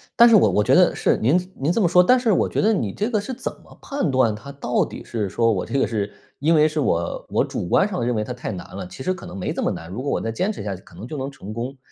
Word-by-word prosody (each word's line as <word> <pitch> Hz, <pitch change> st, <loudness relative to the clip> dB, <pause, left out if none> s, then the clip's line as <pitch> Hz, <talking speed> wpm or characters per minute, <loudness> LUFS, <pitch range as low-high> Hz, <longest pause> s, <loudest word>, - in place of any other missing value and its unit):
但 235 Hz, -, +8 dB
是 225 Hz, -, +7 dB
我 -, -, +6 dB
我 105 Hz, -, +2 dB
觉 -, -, +2 dB
得 -, -, +5 dB
是， -, -, +2 dB
您 180 Hz, +10 st, +1 dB
您 145 Hz, +5 st, 0 dB
这 225 Hz, -, +1 dB
么 175 Hz, -, +4 dB
说， 180 Hz, +1 st, +6 dB
但 255 Hz, +7 st, +5 dB
是 235 Hz, -3 st, +1 dB
我 -, -, +2 dB
觉 -, -, -1 dB
得 220 Hz, +1 st, +3 dB
你 105 Hz, -, -1 dB
这 215 Hz, +4 st, -1 dB
个 215 Hz, -, +1 dB
是 235 Hz, +6 st, -5 dB
怎 255 Hz, -, -4 dB
么 -, -, -17 dB
判 275 Hz, -, -2 dB
断 130 Hz, -4 st, +3 dB
它 140 Hz, +6 st, -10 dB
到 130 Hz, -3 st, 0 dB
底 -, -, -9 dB
是 110 Hz, -4 st, -3 dB
说 115 Hz, +3 st, +2 dB
我 95 Hz, -, -1 dB
这 -, -, -2 dB
个 -, -, +3 dB
是 105 Hz, -1 st, -2 dB, 0.3 s
因 160 Hz, +4 st, +3 dB
为 155 Hz, 0 st, +5 dB
是 155 Hz, 0 st, -2 dB
我 85 Hz, -, -1 dB
我 -, -, +2 dB
主 85 Hz, -, -4 dB
观 195 Hz, -, +3 dB
上 185 Hz, -, -3 dB
认 120 Hz, -1 st, 0 dB
为 105 Hz, -, 0 dB
它 125 Hz, -, -6 dB
太 120 Hz, -2 st, -5 dB
难 90 Hz, -2 st, -8 dB
了， 95 Hz, -2 st, -6 dB
其 130 Hz, -, -9 dB
实 185 Hz, -, 0 dB
可 185 Hz, -, -10 dB
能 90 Hz, -, -8 dB
没 90 Hz, -, -2 dB
这 -, -, -3 dB
么 -, -, +1 dB
难， 80 Hz, -, -7 dB
如 110 Hz, +7 st, -5 dB
果 140 Hz, -, -3 dB
我 -, -, 0 dB
再 115 Hz, -, -2 dB
坚 185 Hz, -, -1 dB
持 -, -, -7 dB
下 100 Hz, -2 st, -3 dB
去 95 Hz, -, -13 dB
可 85 Hz, -, -18 dB
能 100 Hz, -, -8 dB
就 150 Hz, -, -6 dB
能 135 Hz, +1 st, -3 dB
成 110 Hz, -7 st, -9 dB
功， 125 Hz, +4 st, -5 dB
130 Hz, 350 characters per minute, -22 LUFS, -, 0.3 s, 但